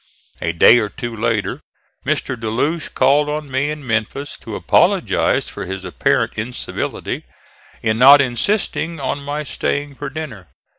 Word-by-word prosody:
A 85 - 0
day 115 +8 +7
or 105 -2 -1
two 120 0 -6
later 115 -1 -1 0.5
Mr. 130 - 0
De 110 -2 -4
Loche 150 +9 -1
called 145 +3 +3
on 150 -2 -4
me 135 +3 0
in 150 -2 -5
Memphis 115 +5 -2
to - - -7
apologize - - +2
for - - -7
his 95 0 -5
apparent 90 - +1
incivility 120 +3 -4 0.6
in 110 -1 +1
not 140 +3 +9
insisting 165 - 0
on 140 +1 -3
my 145 +2 -3
staying 145 0 -2
for 145 +1 -6
dinner. 135 - -7
135 Hz, 150 wpm, -19 LUFS, 110-145 Hz, 0.6 s, not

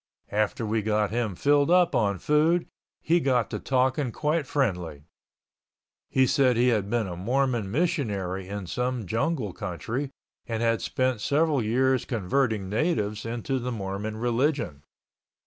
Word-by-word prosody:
After 105 +2 0
we 110 +1 0
got 105 0 0
him 115 -4 -1
filled 145 - +3
up 180 -1 +4
on 100 -3 +1
food 155 - +2 0.4
he 170 +2 +3
got 125 -7 +1
to - - -3
talking 130 0 +1
quite 150 +2 -1
friendly. 90 - -1 1.1
He 130 0 +3
said 130 -3 +3
he 125 +1 +4
had 105 -4 0
been 120 -1 +1
a 90 -2 -5
Mormon 120 +2 0
missionary 105 - -1
in 100 -1 -5
some 125 +4 -2
jungle 115 - -1
country 110 +9 -4 0.4
and 115 -1 -2
had 115 -3 +2
spent 130 0 0
several 150 0 +2
years 130 +3 +2
converting 110 -2 0
natives 105 - -1
into 120 +3 -2
the 125 +1 -3
Mormon 105 0 -4
religion. 120 - 0
120 Hz, 145 wpm, -26 LUFS, 105-135 Hz, 1.1 s, up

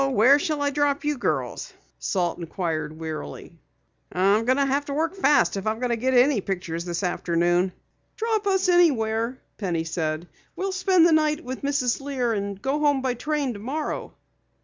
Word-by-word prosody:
"Where 265 +3 +5
shall 300 -1 -1
I 285 - +1
drop 290 +1 0
you 295 0 +1
girls?" 245 - -2 0.3
Salt 180 -3 -1
inquired 160 -3 -3
wearily. 155 - -6 0.6
"I'll 200 +4 +3
have 275 +3 +1
to 280 - -4
work 325 +3 0
fast 295 - +3
if 195 - -4
I 235 +2 0
get 255 +3 0
any 250 -2 +4
pictures 175 -3 -4
this 175 +2 -3
afternoon." 175 +1 +1 0.4
"Drop 440 -2 -1
us 385 -1 +2
anywhere," 250 -9 +2 0.2
Penny 175 -6 -1
said. 160 0 -3 0.3
"We'll 390 +1 -2
spend 370 -2 +4
the 340 - +5
night 310 0 +2
with 260 -1 -6
Mrs. 275 -3 0
Lear 260 -4 -1
and 200 -2 -3
go 270 +7 -1
home 290 -3 +2
by 255 -1 +1
train 285 +1 -2
tomorrow." 265 +9 -4
250 Hz, 160 wpm, -24 LUFS, 190-295 Hz, 0.6 s, Where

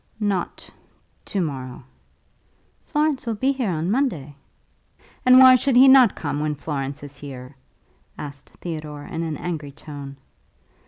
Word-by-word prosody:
"Not 200 -4 -2 0.6
to 200 - -3
morrow." 130 -5 -5 1.0
"Florence 295 -4 -1
will 230 - -1
be 260 +6 +1
here 260 -6 -2
on 170 +1 -1
Monday." 170 - -1 0.9
"And 255 0 +8
why 260 0 +9
should 255 +1 +2
he 260 +2 +8
not 260 -5 +7
come 145 -2 -3
when 150 0 -1
Florence 140 -1 -5
is 145 -1 -10
here?" 130 -2 -9 0.7
asked 145 -1 -9
Theodore, 155 -4 -6
in 165 -2 -5
an 160 -3 -3
angry 155 -5 -5
tone. 140 -1 -10
160 Hz, 140 wpm, -23 LUFS, 145-240 Hz, 1.0 s, why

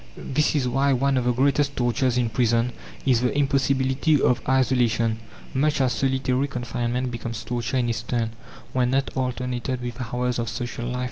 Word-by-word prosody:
This 150 +3 0
is 135 -4 +1
why 135 +3 +2
one 135 +2 +2
of 125 -2 +1
the 125 - +3
greatest 140 +3 +2
tortures 125 +1 +1
in 120 -2 +1
prison 115 0 +2 0.3
is 125 -4 +3
the 125 +3 0
impossibility 135 +1 +2
of 125 -2 +2
isolation, 120 -4 +2 0.3
much 150 +3 +1
as 130 -2 +2
solitary 130 0 0
confinement 125 -1 -2
becomes 115 -1 -5
torture 120 +1 -2
in 125 -1 +1
its 115 -1 -1
turn, 115 -1 -1 0.4
when 125 -1 +2
not 135 +1 +1
alternated 125 0 -2
with 120 0 -5
hours 125 0 -1
of 115 -1 -2
social 120 -1 -4
life. 125 0 -3
125 Hz, 175 wpm, -24 LUFS, 120-135 Hz, 0.4 s, the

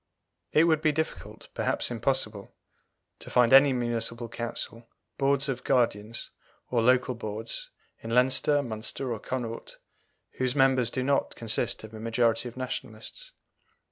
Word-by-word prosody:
It 155 - +5
would 160 -2 +3
be 155 - +3
difficult, 160 +2 -5
perhaps - - -1
impossible, 115 -4 -2 0.6
to - - -10
find 125 0 +4
any 135 +1 +8
Municipal 120 -1 -1
Council, 115 0 -5 0.3
Boards 140 0 +2
of 130 -2 -3
Guardians, 115 -2 0 0.4
or 120 -2 +2
Local 125 +2 +3
Boards, 115 - -6 0.3
in 115 - -8
Leinster, 130 +4 +3
Munster, 120 +2 -3
or 110 - -5
Connaught, 115 -1 -5 0.6
whose 130 0 +1
members 130 -3 +4
do 130 - -2
not 140 +1 +1
consist 115 +1 -1
of 110 0 -10
a 110 - -8
majority 115 +1 +1
of 120 - -16
Nationalists. 130 - -6
125 Hz, 140 wpm, -28 LUFS, 115-135 Hz, 0.6 s, any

